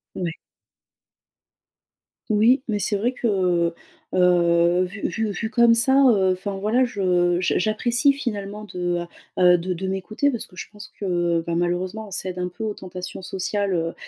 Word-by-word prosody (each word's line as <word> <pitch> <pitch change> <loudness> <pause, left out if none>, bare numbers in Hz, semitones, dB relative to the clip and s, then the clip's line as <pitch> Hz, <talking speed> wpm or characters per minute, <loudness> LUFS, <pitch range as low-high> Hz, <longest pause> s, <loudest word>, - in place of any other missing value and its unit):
Ouais. 175 -3 -2 2.0
Oui, 225 +5 +4
mais 215 -3 0
c'est 205 +1 0
vrai 225 +5 0
que, 180 -8 +1 0.4
heu, 175 -1 +3
vu 190 +3 -7
vu 215 +3 -2
vu 220 +2 -4
comme 235 -1 +5
ça, 230 +4 +3 0.2
heu, 190 -4 +3
enfin 195 +2 -5
voilà, 225 +6 +2
je 180 -5 +1
j 180 - +1
j'apprécie 235 +7 +2
finalement 210 -5 -5
de, 175 -1 -1
heu 175 - -5 0.5
heu, - - +5
de 180 +2 -3
de 190 +2 -4
m'écouter 195 +8 -1
parce 240 -5 -4
que 180 - -20
je - - -7
pense 210 0 -11
que, 175 -3 0
bah, 170 - -1
malheureusement, 180 +5 -2
on - - -18
cède 185 -1 -3
un 180 - -2
peu 205 +5 -8
aux 215 -2 -2
tentations 185 0 -8
sociales, 190 +2 -2
heu 165 -1 -1
190 Hz, 170 wpm, -23 LUFS, 180-215 Hz, 2.0 s, comme